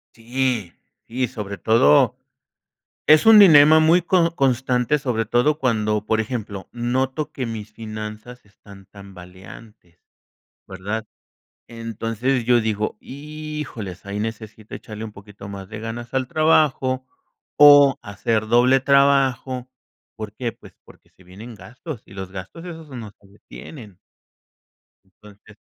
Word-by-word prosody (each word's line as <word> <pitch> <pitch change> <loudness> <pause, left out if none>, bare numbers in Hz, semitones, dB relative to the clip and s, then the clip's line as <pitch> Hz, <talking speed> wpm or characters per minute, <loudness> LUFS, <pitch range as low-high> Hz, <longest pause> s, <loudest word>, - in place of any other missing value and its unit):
Sí, 115 -4 -2 0.3
sí, 125 +2 -2
sobre 105 -5 -7
todo, 105 -11 +4 0.9
es 155 0 +6
un 220 -1 +9
dilema 155 -5 +8
muy 165 +3 +4
co 170 -1 +1
constante 130 0 +1
sobre 125 -5 -2
todo 125 +7 +1
cuando, 110 -5 0
por 110 0 +1
ejemplo, 105 -5 -6
noto 130 +5 -2
que 130 -4 -4
mis 110 -2 -7
finanzas 110 +2 -9
están 100 -1 -17
tambaleantes, 95 -1 -15 0.7
¿verdad?, 105 +4 -5 0.6
entonces 115 +2 -3
yo 120 0 +3
digo 110 -1 -2
híjoles 150 - -8
ahí 100 +1 -4
necesito 110 -1 -7
echarle 110 0 -10
un 110 - -6
poquito 100 -1 -13
más 100 -1 -9
de 110 +1 -8
ganas 120 +2 -7
al 130 -1 -1
trabajo, 140 -4 +2 0.5
o 145 -2 +7
hacer 110 +1 -2
doble 125 +4 +4
trabajo, 135 -2 +2 0.5
¿por 110 -2 -7
qué?, 115 +2 -4
pues - - -17
porque - - -20
se 95 - -23
vienen 105 +7 -11
gastos, 120 - -10
y - - -15
los 95 -1 -7
gastos 95 - -9
esos 165 -3 -9
no 120 -5 -8
se 100 - -21
detienen. 105 - -13 1.3
Entonces 105 0 -17
115 Hz, 130 wpm, -21 LUFS, 105-135 Hz, 1.3 s, un